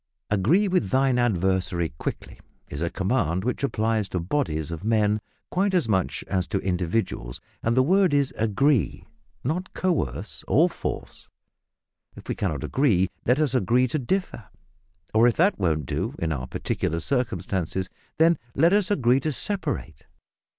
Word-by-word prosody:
"Agree 140 - +3
with 180 - +1
thine 130 0 +2
adversary 95 -6 +1
quickly" - - -5 0.3
is 70 - -6
a 85 - 0
command 95 -3 0
which 125 +4 -2
applies 110 -5 0
to 90 - -2
bodies 85 - -2
of 85 +2 -6
men 105 -1 +2 0.3
quite 190 +1 +1
as 170 -9 +2
much 95 -4 0
as 90 -2 -1
to - - -1
individuals, 90 - -2 0.2
and 115 +2 0
the 130 - +6
word 185 +4 +3
is 140 -2 +1
"agree," 115 +3 +1 0.4
not 175 +8 -2
coerce 170 - -1
or - - +5
force. - - -6 0.9
If - - -12
we - - -1
cannot - - -2
agree, 105 -10 +2 0.2
let 125 +2 +4
us 150 -5 +1
agree 125 +2 +3
to 155 - -1
differ; 160 - -2 0.7
or, 115 +2 +5
if 120 - +2
that 190 +5 +3
won't 80 -6 0
do - - -3
in 80 -1 -2
our 65 -4 -3
peculiar 80 - -2
circumstances, 95 - -2 0.3
then 165 +1 +4 0.2
let 165 +6 +4
us 205 -2 +3
agree 130 - +3
to 155 +3 -1
separate. 145 - -3
115 Hz, 155 wpm, -25 LUFS, 95-145 Hz, 0.9 s, the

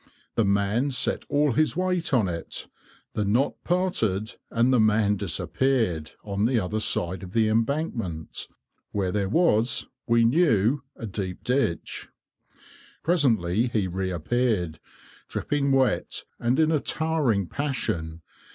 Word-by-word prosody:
The 115 - +2
man 100 +7 +1
set 130 - 0
all 145 0 +3
his 155 +7 +1
weight 180 -2 0
on 120 -7 +3
it, 85 -2 -5 0.5
the 105 - 0
knot 115 +8 0
parted, 115 - 0 0.2
and 120 +3 +2
the 125 - +4
man 105 -1 +3
disappeared 100 - 0
on 100 0 -1
the 120 0 +2
other 105 +2 -2
side 90 -3 -1
of 90 0 -9
the 110 -1 +3
embankment, 110 - -2 0.4
where 95 -3 -1
there 100 -1 -1
was, 125 - +2 0.2
we 115 0 +4
knew, 130 - +3
a 115 - -7
deep 95 -3 -4
ditch. 125 -10 -1 0.9
Presently 115 - +2
he 110 -5 0
reappeared, 95 0 -1 0.5
dripping 140 -1 0
wet, 135 -1 +1
and 120 +4 +1
in 160 0 +4
a 155 - +3
towering 150 - +1
passion. 85 - -3
115 Hz, 130 wpm, -26 LUFS, 100-135 Hz, 0.9 s, the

